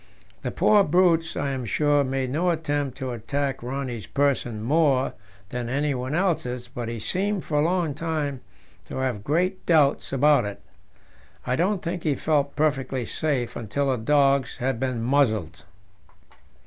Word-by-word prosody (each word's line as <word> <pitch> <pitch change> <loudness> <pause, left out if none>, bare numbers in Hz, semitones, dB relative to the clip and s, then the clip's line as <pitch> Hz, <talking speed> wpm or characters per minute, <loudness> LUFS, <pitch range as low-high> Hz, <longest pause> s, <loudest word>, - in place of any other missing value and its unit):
The - - -2
poor 210 -1 +4
brutes, 165 -1 +2
I 140 -1 -1
am 130 -2 -3
sure, 145 +4 +2
made 130 -1 -2
no 170 +6 +1
attempt 145 -5 -1
to 130 -2 -4
attack 135 +4 -2
Rönne's 125 -2 -4
person 130 -6 0
more 140 -1 +2 0.4
than 125 -1 -4
anyone 135 0 -1
else's, 125 -10 -1
but 120 -1 -5
he 115 -1 -4
seemed 190 - -1
for 150 -2 0
a - - +3
long 170 -2 +1
time 150 -4 -3 0.4
to - - -7
have 130 -6 -2
great 180 - 0
doubts 150 -4 +3
about 140 -1 +4
it. 100 -1 -5 0.9
I 125 - +1
don't 185 +5 0
think 175 +1 -3
he 150 -3 +1
felt 145 -1 0
perfectly 135 -4 0
safe 135 -5 -2
until 135 +5 -1
the 130 - 0
dogs 140 +1 +2
had 130 -2 -1
been 130 -3 -2
muzzled. 110 - +1
140 Hz, 155 wpm, -25 LUFS, 125-155 Hz, 0.9 s, poor